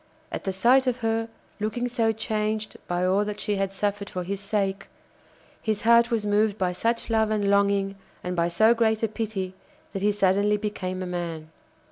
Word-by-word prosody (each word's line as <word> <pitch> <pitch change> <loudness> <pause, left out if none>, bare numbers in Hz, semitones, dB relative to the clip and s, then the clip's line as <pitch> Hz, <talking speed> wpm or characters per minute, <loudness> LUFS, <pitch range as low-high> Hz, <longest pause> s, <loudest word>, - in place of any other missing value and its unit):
At - - -5
the 195 - 0
sight 250 +8 +4
of 250 0 0
her, 225 0 0 0.3
looking 220 +4 -1
so 235 -2 +1
changed 215 -1 -2
by 175 0 0
all 190 +3 +3
that 210 0 -4
she 210 -2 -1
had 195 0 0
suffered 200 +1 -2
for 180 - -4
his 195 +2 -3
sake, 195 -1 -1 0.7
his 215 -2 -1
heart 235 +1 +6
was 225 -3 0
moved 210 0 +2
by 185 -3 +1
such 230 +6 -1
love 220 -1 +3
and 205 -2 +1
longing 200 -1 +2 0.3
and 180 0 -3
by 170 -1 +2
so 220 +7 +4
great 225 -1 +1
a - - +4
pity 210 -4 -3 0.4
that 195 - -3
he 210 +1 +3
suddenly 200 +1 +2
became 185 -3 -3
a - - -4
man. 170 -3 -4
205 Hz, 190 wpm, -26 LUFS, 195-220 Hz, 0.7 s, heart